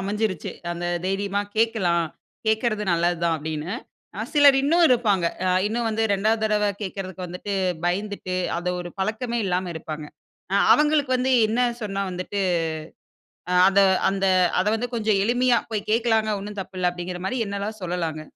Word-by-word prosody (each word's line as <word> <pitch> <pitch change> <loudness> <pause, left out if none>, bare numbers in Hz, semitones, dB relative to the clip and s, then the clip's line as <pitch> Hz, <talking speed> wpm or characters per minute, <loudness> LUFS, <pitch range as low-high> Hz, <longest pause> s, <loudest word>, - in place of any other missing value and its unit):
அமஞ்சிருச்சு. 200 -2 -2 0.2
அந்த 175 0 -4 0.2
தைரியமா 200 +1 -1 0.2
கேட்கலாம். 190 -7 +2 0.4
கேட்க்கறது 220 -1 +1
நல்லது 170 0 +1
தான் 165 -1 +2
அப்டினு. 155 +5 -4 0.6
சிலர் 285 -2 +7
இன்னும் 335 +4 +4
இருப்பாங்க.ஆ 195 -7 +1 0.2
இன்னும் 230 +2 -1
வந்து 220 0 -1
2வது 215 +3 +1
தடவ 210 -1 +2
கேட்கறதுக்கு 185 -1 -5
வந்துட்டு 180 +3 -6 0.3
பயந்துட்டு, 190 0 -2 0.2
அந்த 180 +1 -3
ஒரு 175 0 -7
பழக்கமே 230 +4 -1
இல்லாம 180 0 -1
இருப்பாங்க. 155 -1 -6 0.5
அ - - +3 0.2
அவங்ளுக்கு 295 -2 +2
வந்து 260 +1 +1 0.2
என்ன 235 +3 0 0.2
சொன்னா 200 -1 -2
வந்துட்டு 185 +3 -4 1.3
அத 195 +1 +4 0.3
அந்த 195 0 -1 0.3
அத 185 - +1
வந்து 245 +2 -2
கொஞ்சம் 215 -3 +1
எளிமையா 245 +1 +3
போய் 215 -1 -3
கேட்கலாம்ங்க, 220 -2 +2
ஒண்ணும் 205 0 -6
தப்பு 185 0 -10
இல்ல. 180 -1 +3
அப்டின்கற 175 0 -6
மாரி 255 - -2
என்னெல்லாம் 200 +2 -4
சொல்லலாங்க? 165 -3 -3
200 Hz, 145 wpm, -24 LUFS, 180-225 Hz, 1.3 s, சிலர்